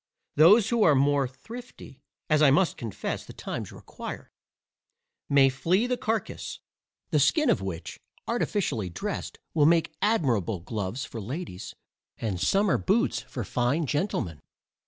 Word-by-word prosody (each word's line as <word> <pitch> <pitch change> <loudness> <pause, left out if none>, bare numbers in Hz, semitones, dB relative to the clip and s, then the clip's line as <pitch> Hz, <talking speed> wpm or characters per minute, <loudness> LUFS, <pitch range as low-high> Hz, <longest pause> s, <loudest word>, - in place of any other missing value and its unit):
Those 195 +8 +6
who 235 -2 +1
are 155 -8 +6
more 140 0 +3
thrifty 180 - -11 0.3
(as 155 -1 +3
I 150 - +7
must 170 +6 +3
confess 115 -4 -4
the - - -11
times - - -5
require) - - -9 1.0
may 140 -1 +6
flay 170 - +1
the 250 0 0
carcass; 220 -3 -3 0.5
the - - +3
skin 305 -3 +4
of - - +1
which, 95 -4 -6 0.3
artificially 200 - -1
dressed, 85 - -5 0.2
will 150 -2 +4
make 165 0 +3
admirable 125 - +1
gloves 105 - -4
for 115 -4 -7
ladies, 125 - -6 0.4
and 100 -6 -3
summer 200 - +3
boots 230 +8 +1
for 120 - -6
fine 125 - 0
gentlemen. 130 - -2
145 Hz, 135 wpm, -27 LUFS, -, 1.0 s, I